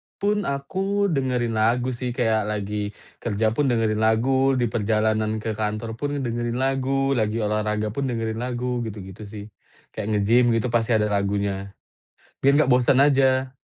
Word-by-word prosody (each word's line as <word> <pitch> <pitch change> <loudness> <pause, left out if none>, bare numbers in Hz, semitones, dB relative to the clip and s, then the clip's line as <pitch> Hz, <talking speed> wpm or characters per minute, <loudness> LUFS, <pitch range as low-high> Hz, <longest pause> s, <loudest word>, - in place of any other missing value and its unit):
pun 205 +1 0
aku 190 +9 -1
dengerin 125 -5 0
lagu 120 +3 +2
sih 125 0 -4
kayak 110 -4 +1
lagi 105 0 -3 0.2
kerja 110 -1 0
pun 140 +4 0
dengerin 110 -3 +1
lagu, 130 +5 +2
di 120 -3 0
perjalanan 110 0 0
ke 110 - -1
kantor 110 +1 -2
pun 145 0 -2
dengerin 120 0 -2
lagu, 135 +1 0
lagi 110 0 0
olahraga 105 0 -1
pun 135 +5 -2
dengerin 115 -2 -2
lagu 125 0 -2
gitu-gitu 100 -1 -8
sih, 105 0 -8 0.5
kayak 105 -2 -5
nge-gym 115 +3 +3
gitu 115 +2 -1
pasti 115 0 +2
ada 105 -1 +1
lagunya, 100 -1 -1 0.7
biar 140 +1 +5
gak - - 0
bosen 125 +1 +4
aja. 135 -2 +3
115 Hz, 155 wpm, -23 LUFS, 105-130 Hz, 0.7 s, biar